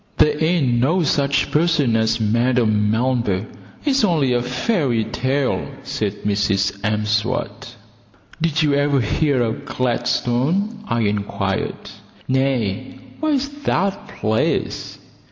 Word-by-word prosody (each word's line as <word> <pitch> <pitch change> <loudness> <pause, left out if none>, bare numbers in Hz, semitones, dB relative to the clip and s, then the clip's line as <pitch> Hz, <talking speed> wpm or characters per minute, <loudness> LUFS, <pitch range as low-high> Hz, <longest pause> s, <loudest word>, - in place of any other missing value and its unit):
"There 150 0 +3
ain't 150 -8 +2
no 165 +9 +2
such 140 -1 +1
person 150 -7 +2
as 110 +1 +1
Madame 110 -1 +2
Melber; 115 -4 0 0.4
it's 275 -4 +2
only 155 -10 +2
a 120 - +1
fairy 125 - 0
tale," 135 +2 -1 0.2
said 105 -5 -3
Mrs 100 -1 0
M'Swat. 105 +2 -1 0.7
"Did 160 -1 +1
you 145 -2 +2
ever 145 0 +2
hear 130 +3 +1
of 110 -1 -3
Gladstone?" 130 - 0
I 115 - 0
inquired. 105 -1 -2 0.4
"No; 130 -7 +1 0.4
where 310 -1 +1
is 275 0 0
that 195 -8 -1
place?" 110 0 -1
125 Hz, 115 wpm, -20 LUFS, 110-150 Hz, 0.7 s, There